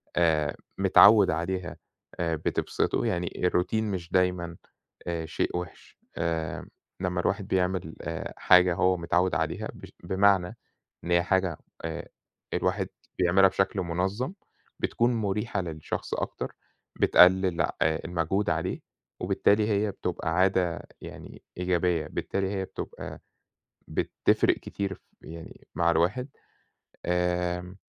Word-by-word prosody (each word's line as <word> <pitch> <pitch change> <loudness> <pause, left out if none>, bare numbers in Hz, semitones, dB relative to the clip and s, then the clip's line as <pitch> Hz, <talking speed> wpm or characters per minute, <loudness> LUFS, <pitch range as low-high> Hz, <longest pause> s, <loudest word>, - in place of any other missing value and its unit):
آآ، 75 -3 +2 0.2
متعوّد 100 -3 +7
عليها 90 +2 -3 0.4
آآ 85 -1 0
بتبْسطه، 80 - -1
يعني 85 -1 0
الRoutine 90 +3 +1
مش 95 -6 -4
دايمًا 90 -2 +1 0.5
آآ 85 -2 -2
شيء 80 +2 -2
وحش، 90 -2 -9 0.2
آآ، 80 -2 -2 0.3
لمّا 90 -1 -1
الواحد - - -1
بيعمل 90 -3 0
آآ 80 +1 -5
حاجة 90 -1 +6
هو 95 0 +3
متعوّد 90 0 +1
عليها 80 0 -2
ب - - -12 0.2
بمعنى 95 0 +2 0.5
إن 85 - -4
هي 85 - +5
حاجة 90 -2 +1 0.3
آآ 80 +1 -5 0.5
الواحد - - 0 0.3
بيعملها 95 +2 +5
بشكل 95 +1 0
منظم 95 - -2 0.5
بتكون 120 +1 +1
مُريحة 105 0 -1
للشخص 80 -3 -4
أكتر، - - -4 0.4
بتقلّل 90 -1 +5
آآ - - 0 0.4
المجهود 90 +4 0
عليه - - -1 0.4
وبالتالي 105 +1 +2
هي 105 0 +1
بتبقى 85 -3 -3
عادة 90 -2 +2 0.2
يعني - - -10 0.2
إيجابية، 90 -3 +1
بالتالي 95 +4 -2
هي 95 -1 -2
بتبقى - - -7 0.7
بتفرق - - +2
كتير 100 -1 -4
في - - -22 0.2
يعني 80 0 -11
مع 85 -1 +3
الواحد 95 +11 +1 0.8
آمم 90 +1 -1
90 Hz, 120 wpm, -27 LUFS, 85-95 Hz, 0.8 s, متعوّد